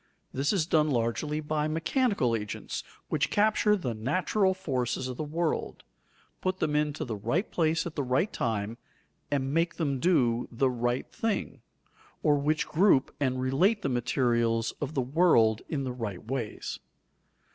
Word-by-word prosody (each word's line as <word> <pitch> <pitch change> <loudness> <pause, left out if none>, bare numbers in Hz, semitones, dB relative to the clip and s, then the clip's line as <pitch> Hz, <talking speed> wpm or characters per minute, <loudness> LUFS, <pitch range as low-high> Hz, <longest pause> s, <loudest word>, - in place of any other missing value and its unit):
This 140 +2 +1
is 185 -6 +1
done 155 -2 +3
largely 140 +5 -1
by 150 0 -1
mechanical 165 - +1
agents, 105 -2 -4 0.3
which - - +1
capture 210 0 +3
the 135 - -3
natural 185 - +1
forces 130 -8 -2
of 130 - -5
the 155 - -3
world, 160 +2 -2 0.6
put 185 0 -1
them 150 -5 0
into 150 +1 0
the 115 -4 -4
right 120 - -1
place 165 -1 +1
at 170 - -5
the 150 - -2
right 135 +10 0
time, 110 -1 -2 0.5
and 135 -1 -1
make 165 +1 +1
them 140 -5 -1
do 125 -8 +2
the 130 +2 +1
right 120 +1 -1
thing, 225 -2 -2 0.6
or 150 - +5
which 150 +2 0
group 160 -5 +3
and 130 -3 0
relate 175 - +2
the 140 - 0
materials 120 -2 +1
of 145 +1 -3
the 135 - +2
world 120 -7 +4
in 145 -4 -1
the 130 -2 -3
right 110 -7 -5
ways. 120 -3 -4
140 Hz, 155 wpm, -28 LUFS, 120-165 Hz, 0.6 s, or